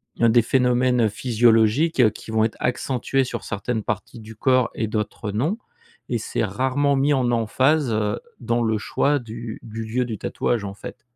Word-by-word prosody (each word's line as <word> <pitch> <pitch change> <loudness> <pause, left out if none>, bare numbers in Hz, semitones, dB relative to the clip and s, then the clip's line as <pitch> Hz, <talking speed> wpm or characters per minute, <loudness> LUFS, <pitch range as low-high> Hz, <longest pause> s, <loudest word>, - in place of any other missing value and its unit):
il - - -10
y - - +5
a 115 - +6
des 120 +1 +5
phénomènes 125 -2 +2
physiologiques 115 +4 +3
qui 110 - -10
vont 110 0 +2
être 110 - -4
accentués 130 +1 0
sur 125 - -5
certaines 110 +1 -3
parties 110 +3 -4
du 110 0 -11
corps 130 +1 +2
et 110 - -2
d'autres 105 0 -3
non. 145 - 0 0.5
Et 120 - 0
c'est 115 - -2
rarement 130 +7 +1
mis 140 +2 +2
en 130 -3 +1
emphase, 130 +4 +2
heu, 105 -1 0 0.2
dans 120 0 0
le 110 -1 +1
choix 145 +7 +1
du 115 -1 -7
du 115 0 -6
lieu 120 +3 -1
du 110 -3 -5
tatouage, 120 -4 -1
en 100 -1 -5
fait. - - -10
115 Hz, 190 wpm, -23 LUFS, 110-130 Hz, 0.5 s, a